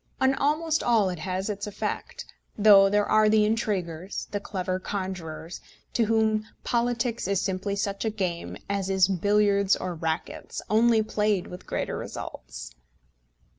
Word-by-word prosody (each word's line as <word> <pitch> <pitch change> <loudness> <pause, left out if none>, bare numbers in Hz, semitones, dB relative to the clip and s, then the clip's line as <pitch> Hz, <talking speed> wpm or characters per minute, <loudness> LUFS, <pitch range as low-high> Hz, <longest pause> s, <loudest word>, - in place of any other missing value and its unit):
On 265 0 +4
almost 310 +3 +1
all 225 -5 +3
it 175 - -6
has 185 +2 -3
its 205 -1 -3
effect; 205 - -4 0.3
though 200 -2 +7
there 205 +1 +2
are 215 0 +4
the 215 0 +4
intriguers, 195 -5 -2
the 205 - -1
clever 185 -2 -3
conjurers, 185 -4 -5 0.3
to 230 - +2
whom 220 -1 +2 0.2
politics 235 -2 0
is 195 -1 +1
simply 195 +1 -2
such 200 0 -2
a 220 - +1
game 185 -5 -3
as 200 -1 -2
is 190 -1 +4
billiards 200 +1 +3
or 185 - -4
rackets, 160 0 -4
only 225 0 +4
played 210 -3 0
with 180 - -10
greater - - -2
results. - - -8
200 Hz, 145 wpm, -26 LUFS, 185-220 Hz, 0.3 s, though